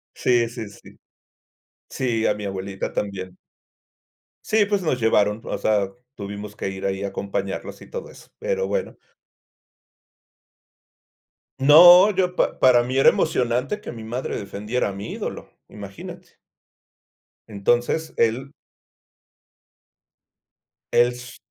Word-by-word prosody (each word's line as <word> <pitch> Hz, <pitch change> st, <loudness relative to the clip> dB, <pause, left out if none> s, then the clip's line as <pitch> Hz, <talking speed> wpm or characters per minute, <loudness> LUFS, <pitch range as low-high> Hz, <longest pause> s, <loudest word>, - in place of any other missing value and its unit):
Sí, 120 Hz, -2 st, +2 dB
sí, 115 Hz, -2 st, -7 dB
sí. 100 Hz, -, -16 dB, 1.0 s
Sí, 115 Hz, -4 st, -1 dB
a -, -, +3 dB
mi 105 Hz, 0 st, -7 dB
abuelita 95 Hz, 0 st, -4 dB
también. 95 Hz, -3 st, -4 dB, 1.1 s
Sí, 215 Hz, -1 st, +3 dB
pues, 205 Hz, -2 st, 0 dB
nos 130 Hz, -7 st, -1 dB
llevaron. 105 Hz, -1 st, +2 dB
O -, -, -4 dB
sea, 105 Hz, -3 st, +1 dB, 0.2 s
tuvimos 100 Hz, 0 st, -8 dB
que -, -, -3 dB
ir 95 Hz, 0 st, -7 dB
ahí 95 Hz, 0 st, -2 dB
a 100 Hz, -, -2 dB
acompañarlos 100 Hz, 0 st, -5 dB
y -, -, -14 dB
todo 485 Hz, -1 st, -7 dB
eso, -, -, -16 dB
pero 475 Hz, 0 st, -1 dB
bueno. -, -, -3 dB, 2.6 s
No, 175 Hz, +8 st, +8 dB
yo 180 Hz, -2 st, 0 dB
pa -, -, 0 dB
para 120 Hz, -2 st, +5 dB
mí 130 Hz, +2 st, -2 dB
era 135 Hz, -, +6 dB
emocionante 125 Hz, -, +1 dB
que -, -, -8 dB
mi 115 Hz, -2 st, -9 dB
madre 120 Hz, +4 st, -4 dB
defendiera 105 Hz, +4 st, -3 dB
a -, -, -6 dB
mi 100 Hz, +1 st, -7 dB
ídolo, -, -, -6 dB, 0.2 s
imagínate. 100 Hz, -2 st, -10 dB, 1.2 s
Entonces, 120 Hz, +9 st, 0 dB
él 125 Hz, +5 st, 0 dB, 2.4 s
Es 125 Hz, +1 st, +1 dB
115 Hz, 120 wpm, -23 LUFS, 100-135 Hz, 2.6 s, No